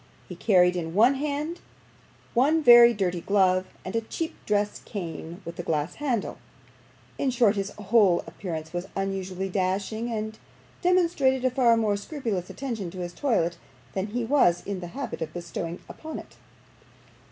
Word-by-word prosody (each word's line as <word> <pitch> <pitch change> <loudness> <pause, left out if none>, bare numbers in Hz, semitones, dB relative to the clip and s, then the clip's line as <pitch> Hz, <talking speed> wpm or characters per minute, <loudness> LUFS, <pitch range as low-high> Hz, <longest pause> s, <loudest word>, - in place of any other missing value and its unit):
He - - -8
carried 180 -3 +4
in 165 -1 -4
his 240 +7 +5
hand 300 +4 -3 0.7
one 300 +6 +3
very 240 -2 +9
dirty 185 -5 -1
glove, 185 -2 +2 0.2
and 185 - -5
a 230 - +2
cheap 320 +8 -4
dress 205 0 0
cane 175 -1 -6
with 170 +1 -8
a - - +1
glass 155 0 -1
handle; 250 -8 -1 0.8
in 275 - +1
short, 235 -4 +3
his 195 -1 -2
whole 205 -3 +4
appearance 165 -1 -6
was 175 +2 -3
unusually 195 -1 -2
dashing, 195 +5 -1
and 220 0 -4 0.4
demonstrated 335 -8 +2
a 255 - +3
far 240 -2 +4
more 210 -3 +1
scrupulous 205 - -4
attention 230 -9 -4
to 185 - -11
his 175 0 -5
toilet 175 - 0 0.3
than 190 +1 -2
he 235 +2 -2
was 225 -10 +3
in 200 -2 -3
the 175 - -6
habit 275 -4 -4
of 155 -1 -4
bestowing 170 0 -5
upon 315 0 -7
it. - - -11
205 Hz, 160 wpm, -26 LUFS, 180-245 Hz, 0.8 s, very